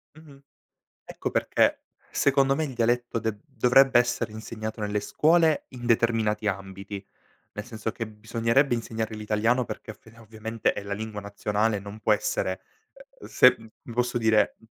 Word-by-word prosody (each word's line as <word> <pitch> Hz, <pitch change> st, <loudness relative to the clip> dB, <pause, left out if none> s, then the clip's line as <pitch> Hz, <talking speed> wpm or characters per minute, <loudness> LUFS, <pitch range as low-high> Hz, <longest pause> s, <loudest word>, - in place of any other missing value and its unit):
Mh-mh. 150 Hz, -3 st, -16 dB, 0.6 s
Ecco -, -, -5 dB
perché -, -, +2 dB, 0.3 s
secondo 135 Hz, -1 st, +3 dB
me 160 Hz, -, -1 dB
il 140 Hz, -, -4 dB
dialetto 120 Hz, 0 st, 0 dB
de 110 Hz, -1 st, -2 dB
dovrebbe 135 Hz, -1 st, +4 dB
essere 120 Hz, -2 st, -1 dB
insegnato 110 Hz, 0 st, -6 dB
nelle 105 Hz, 0 st, -1 dB
scuole, 160 Hz, +6 st, +3 dB
in 120 Hz, -2 st, -9 dB
determinati 110 Hz, -2 st, +1 dB
ambiti. 100 Hz, 0 st, -5 dB, 0.5 s
Nel 105 Hz, -, -5 dB
senso 110 Hz, -2 st, -4 dB
che 115 Hz, -, -5 dB
bisognerebbe 115 Hz, +5 st, +1 dB
insegnare 110 Hz, -1 st, -3 dB
l'italiano, 110 Hz, +4 st, +1 dB
perché 115 Hz, -, -7 dB
ovvia 115 Hz, +1 st, -17 dB
ovviamente 110 Hz, 0 st, -2 dB
è -, -, -6 dB
la 100 Hz, 0 st, -4 dB
lingua 110 Hz, 0 st, -5 dB
nazionale, 105 Hz, +1 st, -1 dB
non 100 Hz, +2 st, -9 dB
può 110 Hz, -, +3 dB
essere, 105 Hz, -3 st, -1 dB, 0.6 s
ehm, -, -, -10 dB
se 125 Hz, 0 st, +6 dB, 0.4 s
posso 125 Hz, +1 st, 0 dB
dire, 110 Hz, -2 st, +3 dB
110 Hz, 145 wpm, -26 LUFS, 105-125 Hz, 0.6 s, se